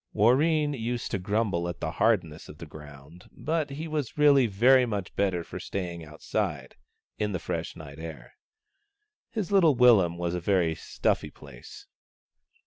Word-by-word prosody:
Warreen 145 +7 +3
used 120 -1 -3
to 95 - -1
grumble 95 -3 -1
at 85 - -6
the 80 - -3
hardness 85 -5 0
of 75 - -11
the 80 - -9
ground, 75 +2 -13
but 155 -1 -2
he 150 +4 -6
was 150 -5 -4
really 140 -4 +5
very 125 +6 +5
much 105 -6 -4
better 95 -4 0
for - - -8
stay 90 -3 -4
ing 85 -1 -9
outside, 75 -1 -4 0.4
in 105 -1 -1
the - - 0
fresh - - -4
night 75 -1 -11
air. 80 -7 -9 1.0
His 210 -4 -4
little 170 -8 +5
willum 110 -9 +5
was 85 0 -2
a 90 - -1
very 90 -3 +2
stuffy - - -2
place. 70 -5 -13
100 Hz, 160 wpm, -27 LUFS, 85-130 Hz, 1.0 s, really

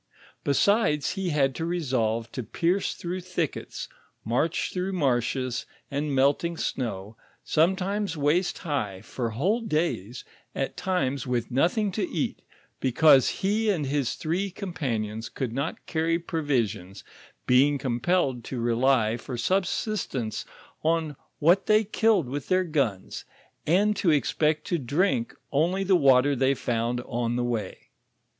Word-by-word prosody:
Besides, 150 - +2
he 190 -2 -2
had 140 -4 +2
to 160 - -4
resolve 125 -10 -1
to 130 - -4
pierce 175 - 0
through 180 +2 -4
thickets, 175 -4 -4 0.4
march 135 +9 0
through 185 +1 -2
marshes 130 -4 0 0.2
and 145 0 -1
melting 145 +5 +2
snow, 110 -7 -3 0.3
sometimes 190 +3 +1
waist 150 +6 +1
high, 105 - -3
for 115 +2 -4
whole 185 - 0
days, 155 - -2 0.3
at - - -2
times 140 -9 -1
with 120 -1 -1
nothing 180 - +2
to 190 -1 -2
eat, 160 - -2 0.4
because 135 +1 +5
he 210 +3 0
and 170 -8 +1
his 140 -2 -1
three 180 +5 -1
companions 120 - -3
could 125 -4 -4
not 140 +5 -3
carry 165 0 0
provisions, 120 - -2 0.4
being 140 +3 +4
compelled 130 0 0
to 130 - -4
rely 120 -1 +2
for 125 0 -6
subsistence 185 - -1 0.4
on 160 -2 +1 0.2
what 175 +6 +3
they 215 +1 +5
killed 215 - +2
with 140 +2 -5
their 185 0 +3
guns, 135 - -2 0.4
and 205 +6 +3
to 185 - +2
expect 150 +1 +1
to 175 -4 -1
drink 195 - 0 0.2
only 175 +7 +1
tho 195 0 +2
water 140 -2 +5
they 135 +1 +2
found 120 0 -1
on 120 -1 -2
the 125 - 0
way. 120 -3 -4
145 Hz, 135 wpm, -26 LUFS, 125-180 Hz, 0.4 s, because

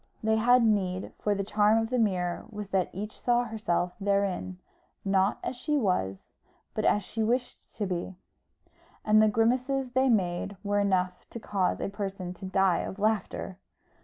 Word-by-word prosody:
They 220 0 +2
had 245 +2 +5
need, 190 -4 0
for 205 -1 +1
the 200 - -1
charm 210 +2 +3
of 225 +1 -1
the 250 - +1
mirror 180 -5 0
was 210 -3 -7
that 190 -2 +1
each 210 +3 -6
saw 245 0 +3
herself 210 -6 -1
therein, 195 -2 0 0.5
not 195 +1 +2
as - - -3
she 300 +4 -1
was, 140 - -1 0.4
but - - -1
as 205 - +3
she 220 +3 -4
wished 245 +3 -2
to 210 - -2
be; 185 0 -3 0.9
and 215 0 +5
the 215 - +5
grimaces 255 +4 +1
they 260 +1 +3
made 195 -2 0
were 205 0 +1
enough 185 -2 0
to 235 - -7
cause 195 -4 0
a - - -2
person 195 -3 -5
to 190 +2 -10
die 190 -1 +2
of 190 - -5
laughter. 205 -2 -1
205 Hz, 170 wpm, -28 LUFS, 185-225 Hz, 0.9 s, had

